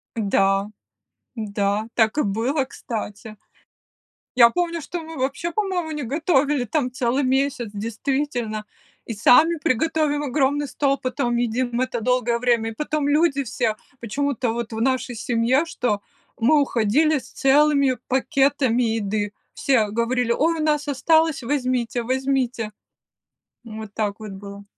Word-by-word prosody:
Да, 195 -2 +1 0.7
да, 205 0 -1
так 225 +4 +2
и - - +3
было, 230 +8 0
кстати. 220 -4 -7 1.0
Я 235 -2 +8
помню, 340 +3 -2
что 345 +4 -5
мы 320 0 -9
вообще, 280 +6 -2
по-моему, 365 -4 -2
не 300 -2 -4
готовили 285 0 +1
там 255 +1 -1
целый 255 +2 0
месяц, 260 -3 0
действительно, 230 0 -2 0.4
и 230 - -4
сами 300 +10 +5
приготовим 300 0 0
огромный 285 +1 0
стол, 275 0 0
потом 245 -2 -1
едим 240 +1 -1
это 250 -2 -2
долгое 245 0 +1
время. 235 -2 +1
И - - -9
потом 300 +1 -1
люди 290 -2 +2
все 230 -2 -1 0.2
почему-то 255 +1 -1
вот 235 -1 -4
в 220 - -3
нашей 260 -1 0
семье, 235 +5 +1
что 245 -10 -2 0.4
мы 285 +5 +4
уходили 280 +6 +2
с - - -9
целыми 280 -1 +3
пакетами 265 -2 +2
еды. 210 -2 -1 0.2
Все 235 -6 +2
говорили: 235 +2 0
"Ой, 320 +6 +1
у - - 0
нас 300 -1 +1
осталось, 315 +1 +2
возьмите, 250 -3 -1
возьмите". 255 -3 -1 0.9
Вот 220 -2 -9
так 210 -1 -2
вот 210 -2 -7
было. 200 +1 -10
255 Hz, 135 wpm, -22 LUFS, 225-290 Hz, 1.0 s, Я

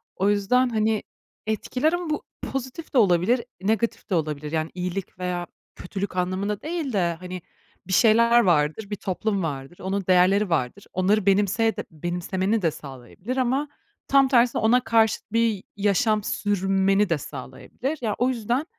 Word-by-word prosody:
O 195 +2 +1
yüzden, 210 +5 +2
hani, 220 -1 0 0.4
etkiler 250 - 0
ama 350 -2 -2
bu 300 - -2 0.3
pozitif 270 +5 -5
de - - +2
olabilir, 205 +3 +3 0.2
negatif 220 +3 -1
de 190 - +1
olabilir. 150 -2 -2
Yani, 160 0 -1
iyilik 180 +1 -5
veya 180 -1 -3 0.3
kötülük 195 +1 -5
anlamında 190 +3 -1
değil 315 -4 -3
de, 175 -4 +1
hani, 180 0 -7 0.5
bir 190 - -2
şeyler 235 +3 +5
vardır, 170 +2 +1
bir 210 - -2
toplum 195 +1 -2
vardır, 140 +1 -5
onun 195 +1 -2
değerleri 185 +2 +4
vardır, 165 +4 -1
onları 195 +2 +2
benimseye 205 +3 +2
de 210 - -4
benimsemeni 180 +6 -1
de 165 -3 +2
sağlayabilir. 145 - -8
Ama 260 +3 +1 0.4
tam 275 -1 +5
tersine 245 -2 +3
ona 245 +3 +4
karşıt 220 -2 +1
bir 225 -3 +1
yaşam 210 +1 +2
sürmeni 195 0 +1
de 165 - +2
sağlayabilir. 145 - -6
Ya, 220 -3 -1
o 250 +2 +2
yüzden 245 +3 -1
200 Hz, 155 wpm, -24 LUFS, 180-230 Hz, 0.5 s, şeyler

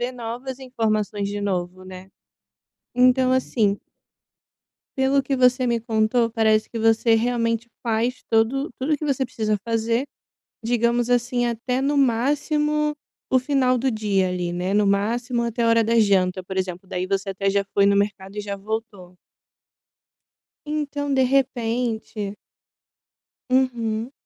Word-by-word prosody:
novas 245 +3 -6
informações 215 -5 -1
de 205 0 -4
novo, 185 -2 -3
né, 185 0 -11 0.9
então 255 +1 +4
assim 220 -5 +1 1.2
Pelo 265 +1 +3
que 275 - -1
você 255 0 +3
me 235 -1 +1
contou 225 +1 +1
parece 220 -1 +2
que 230 - -5
você 225 +1 +3
realmente 230 0 0
faz 235 +2 -1
todo 230 +6 +1
tudo 295 +3 0
que 305 - -6
você 275 -2 0
precisa 220 -4 -1
fazer, 230 +2 0 0.6
digamos 235 +1 +1
assim 245 0 +1
até 240 +2 -1
no 285 +2 +1
máximo 295 +4 +1 0.4
o 260 - +4
final 255 -1 +2
do 260 +2 0
dia 205 -4 0
ali, 180 -1 -3
né, 180 +2 -2
no 205 0 +3
máximo 235 +5 0
até 235 0 -1
a - - +3
hora 230 0 +4
da 230 +1 +2
janta 190 -3 +2
por 190 +1 -7
exemplo, 185 0 -3
daí 180 0 -3
você 195 +1 -1
até 195 +1 -1
já 200 0 +1
foi 200 - +4
no 200 0 +4
mercado 200 0 -2
e - - -1
já 200 -1 -4
voltou. 200 -3 -6 1.5
Então 290 -1 -2
de 265 -1 +3
repente 240 -5 -1 1.2
Uhum. 240 -2 0
230 Hz, 140 wpm, -23 LUFS, 205-255 Hz, 1.5 s, então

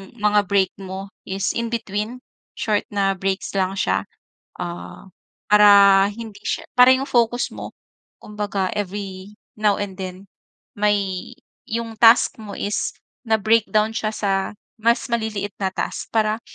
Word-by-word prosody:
mga 210 -2 +2
break 195 -1 +2
mo 190 0 -6 0.2
is 195 0 -2
in-between, 230 0 -3 0.4
short 210 -2 0
na 195 -1 +1
breaks 195 +1 -3
lang 190 -1 +1
siya. - - +1 0.6
Ah, 175 +2 -7 0.4
para 200 -2 +7
hindi 215 -1 -9
siya - - -2
para 250 +1 +8
yung 265 +1 -1
focus 240 -1 +1
mo, - - -7 0.5
kumbaga, 205 -3 -3
every 200 0 -5 0.2
now 210 -1 +2
and 195 -2 -5
then, 185 +1 -7 0.5
may 200 -3 0 0.4
yung 230 0 -4
task 230 0 +6
mo 205 -2 -8
is 205 +1 -2 0.3
na-breakdown 220 0 +2
siya 220 -1 -1
sa 205 -2 -1 0.5
mas 235 +1 +2
maliliit 210 -3 -2
na 190 - +1
task 190 - -4
para 220 0 +1
205 Hz, 130 wpm, -22 LUFS, 195-220 Hz, 0.6 s, para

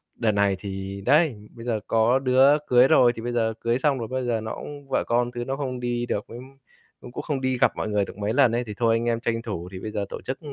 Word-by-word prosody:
đợt 110 -3 +1
này 100 -1 +2
thì 95 0 -6
đấy, 140 -9 +2
bây 115 0 -10
giờ 115 -3 0
có 115 +4 +3
đứa 135 +2 +5
cưới 125 +1 +6
rồi, 120 -3 +5
thì 115 - -7
bây 120 +1 -3
giờ 110 -1 +1
cưới 115 +1 0
xong 140 -4 +2
rồi 115 - -4
bây 130 -1 -3
giờ 115 -2 0
nó 110 - -5
cũng 145 -1 -9
vợ - - +1
con 120 +1 +1
thứ 120 -1 -5
nó 135 - -2
không 130 -3 -4
đi 120 0 -2
được 105 - -3
với 115 - -9 0.6
cũng 120 - -10
cũng - - -6
không 140 -4 -2
đi 130 -1 0
gặp - - +4
mọi - - -3
người 105 -1 +1
được - - -11
mấy 105 +2 -2
lần 130 -4 +4
ấy, 120 +1 0
thì 105 - -5
thôi 115 -1 +3
anh 115 +1 -1
em 115 -1 0
tranh 115 -2 -1
thủ 90 -6 -5
thì 95 - -7
bây 110 - -6
giờ 100 -1 -2
tổ - - -7
chức 130 +1 -4
120 Hz, 285 wpm, -24 LUFS, 110-130 Hz, 0.6 s, cưới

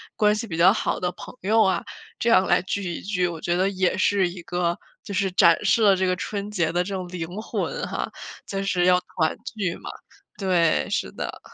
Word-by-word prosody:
关 210 0 +3
系 225 +1 -4
比 165 -3 -5
较 185 +4 +6
好 - - -1
的 180 -1 -1
朋 - - -11
友 220 +3 +3
啊， 190 -4 +1 0.3
这 235 - 0
样 190 -5 +5
来 175 - +3
聚 200 +1 -3
一 - - -6
聚， 180 -2 0
我 170 -2 -5
觉 175 +2 -1
得 190 +2 +2
也 190 -1 0
是 190 -1 +3
一 175 0 -9
个， 175 0 -1 0.3
就 200 - -7
是 195 0 0
展 170 -2 +5
示 230 - +3
了 200 -2 +6
这 190 - 0
个 185 - +1
春 200 +2 -4
节 170 -6 0
的 175 +1 +1
这 195 +1 -4
种 185 -1 -4
灵 175 -3 -5
魂 - - -3
哈， - - -4 0.4
就 195 0 -3
是 180 -3 +1
要 180 0 +5
团 160 -3 -1
聚 200 -6 -3
嘛， - - -9 0.5
对， 180 -5 +2
是 65 - -1
的。 - - -6
185 Hz, 240 characters per minute, -24 LUFS, 175-200 Hz, 0.5 s, 较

